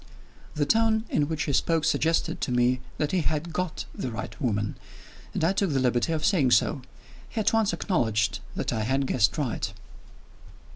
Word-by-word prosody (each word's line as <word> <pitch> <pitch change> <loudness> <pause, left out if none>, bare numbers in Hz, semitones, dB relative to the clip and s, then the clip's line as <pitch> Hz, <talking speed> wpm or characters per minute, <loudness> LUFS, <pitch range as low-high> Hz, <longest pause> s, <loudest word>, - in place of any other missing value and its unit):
The 150 -1 +1
tone 225 +3 +2
in 145 - +2
which 160 -1 -2
he 145 - -2
spoke 165 +2 +2
suggested 165 0 +1
to - - -1
me 125 +1 +2 0.2
that 150 - -1
he 185 - +2
had 155 +2 -2
got 180 -3 -3
"the 130 - -4
right 115 - -6
woman" 105 -5 0 0.6
and - - -2
I 170 +4 +3
took 195 -1 +1
the 135 - +2
liberty 125 +3 +1
of 155 -1 0
saying 165 -11 +3
so. 135 - -1 0.5
He 230 - -4
at 215 - +2
once 225 -1 +3
acknowledged 110 - 0 0.2
that - - -2
I 110 - -1
had 135 +5 +1
guessed 115 -5 +2
right. 140 -7 -2
150 Hz, 185 wpm, -27 LUFS, 125-170 Hz, 0.6 s, I